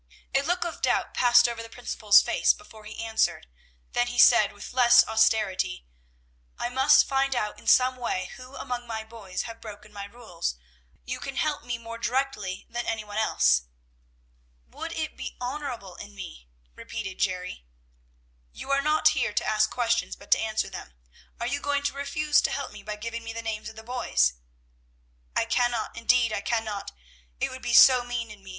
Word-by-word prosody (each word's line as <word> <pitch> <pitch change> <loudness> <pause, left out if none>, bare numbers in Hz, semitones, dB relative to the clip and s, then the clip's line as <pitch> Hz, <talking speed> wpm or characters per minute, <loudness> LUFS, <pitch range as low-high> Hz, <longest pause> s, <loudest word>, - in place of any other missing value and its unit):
A 270 - +3
look 350 +4 -1
of 340 - -6
doubt - - +1
passed 240 -1 +5
over 235 -1 -4
the 230 - -9
principal's 220 -3 +4
face - - +3
before 220 -9 -15
he 215 +2 -7
answered, 220 - 0 0.5
then 245 0 +1
he 245 0 -5
said 235 -3 +7
with 205 +3 -10
less 240 -2 +6
austerity, 215 - +1 0.7
"I 240 - -2
must 265 +3 +5
find 270 0 +1
out 210 -3 -2
in - - -15
some 255 0 +5
way 185 -7 -3
who 255 +2 -12
among 245 -2 -5
my 220 -1 -4
boys 220 -4 -6
have 230 -1 -9
broken 210 -1 -11
my 200 -1 -6
rules; 200 - -5 0.5
you - - -4
can 275 -1 -6
help 305 0 -1
me 240 -1 -3
more 230 0 -9
directly 235 -6 -2
than 240 +1 -4
any 220 -1 -2
one 210 0 -4
else." 65 - +3 1.1
"Would 325 0 -6
it 310 -2 -4
be - - -7
honorable 245 -6 -5
in 70 - -10
me?" 60 -2 -9 0.3
repeated 190 - -7
Jerry. 180 - -2 0.8
"You 275 - -7
are 275 0 +3
not 305 +1 +4
here 265 -8 -1
to - - 0
ask 215 0 +2
questions, 235 -1 0
but - - -17
to - - +6
answer 220 -1 -1
them. 65 - -9 0.4
Are 235 - -2
you 280 +4 -1
going 285 0 0
to 285 - -1
refuse 290 +2 +1
to - - 0
help 280 - -4
me 210 - -11
by 210 +1 -5
giving 230 +2 -6
me 225 0 -6
the 230 0 -6
names 215 -1 -4
of 220 - -13
the 220 - -10
boys?" 65 - +1 1.0
"I - - +2
cannot, 240 -2 0
indeed 230 -1 +2
I 200 - -2
cannot; 220 -3 -2 0.5
it - - -1
would 260 0 -9
be 240 -1 0
so 255 -2 +8
mean 240 -2 -4
in 205 -2 -12
me. 195 - -12
230 Hz, 190 wpm, -26 LUFS, 210-250 Hz, 1.1 s, so